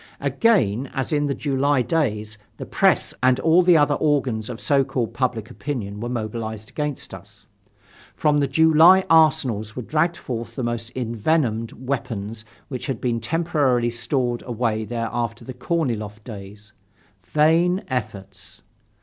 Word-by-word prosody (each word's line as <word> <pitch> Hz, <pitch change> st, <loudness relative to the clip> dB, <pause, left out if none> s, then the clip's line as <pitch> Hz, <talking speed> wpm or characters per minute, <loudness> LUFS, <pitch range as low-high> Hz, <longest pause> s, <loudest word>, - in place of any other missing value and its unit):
Again, 130 Hz, -, +1 dB
as 135 Hz, +3 st, -2 dB
in 145 Hz, -1 st, +1 dB
the 140 Hz, -, -1 dB
July 140 Hz, -1 st, +1 dB
days, 110 Hz, -7 st, -1 dB, 0.2 s
the -, -, -6 dB
press -, -, +2 dB
and 130 Hz, 0 st, +3 dB
all 165 Hz, +2 st, +5 dB
the 175 Hz, -2 st, +5 dB
other 145 Hz, -1 st, +3 dB
organs 135 Hz, -8 st, 0 dB
of 120 Hz, -2 st, -6 dB
so 140 Hz, +1 st, +2 dB
called 130 Hz, -4 st, -3 dB
public 120 Hz, -4 st, -2 dB
opinion 105 Hz, -8 st, -5 dB
were 120 Hz, +2 st, -4 dB
mobilized 110 Hz, -2 st, -5 dB
against 150 Hz, -7 st, -4 dB
us. 100 Hz, +2 st, -13 dB, 0.7 s
From 150 Hz, -1 st, +2 dB
the 140 Hz, -, +1 dB
July 160 Hz, +6 st, +6 dB
arsenals 135 Hz, -10 st, +3 dB
were 125 Hz, -, -5 dB
dragged 165 Hz, +6 st, 0 dB
forth 120 Hz, -2 st, -6 dB
the 130 Hz, -, -3 dB
most 120 Hz, 0 st, -3 dB
envenomed 115 Hz, -1 st, -1 dB
weapons 115 Hz, -4 st, -5 dB, 0.2 s
which 130 Hz, -1 st, -6 dB
had 135 Hz, -5 st, -3 dB
been 120 Hz, -2 st, -1 dB
temporarily 135 Hz, -3 st, +1 dB
stored 120 Hz, 0 st, -1 dB
away 115 Hz, -2 st, -1 dB
there 115 Hz, 0 st, -3 dB
after 115 Hz, -1 st, -3 dB
the 130 Hz, -, -7 dB
Korniloff 115 Hz, -8 st, -3 dB
days. 105 Hz, -1 st, -11 dB, 0.5 s
Vain 165 Hz, -, +2 dB
efforts! 100 Hz, -7 st, -6 dB
125 Hz, 145 wpm, -22 LUFS, 110-145 Hz, 0.7 s, July